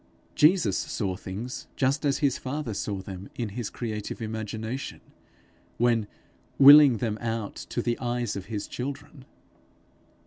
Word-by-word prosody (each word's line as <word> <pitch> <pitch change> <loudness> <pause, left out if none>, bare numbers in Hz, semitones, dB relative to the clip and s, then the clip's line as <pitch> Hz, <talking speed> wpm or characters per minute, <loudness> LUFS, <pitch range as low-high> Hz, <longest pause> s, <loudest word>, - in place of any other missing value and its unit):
Jesus 150 - +4
saw 95 -3 -2
things 100 +7 -6
just 135 +3 +1
as 140 -1 +2
his 135 - +1
father 135 -3 -4
saw 100 -1 -3
them 95 0 -8
in 115 -3 -3
his 110 +2 -4
creative 110 -3 -5
imagination, 110 +2 -5 0.8
when 115 -3 +2 0.5
willing 140 -2 +9
them 110 -2 -2
out 115 -3 -3 0.2
to - - -2
the 120 0 -1
eyes 120 -2 -2
of 95 -2 -5
his 105 -2 -4
children. 140 +1 -7
115 Hz, 135 wpm, -27 LUFS, 105-135 Hz, 0.8 s, willing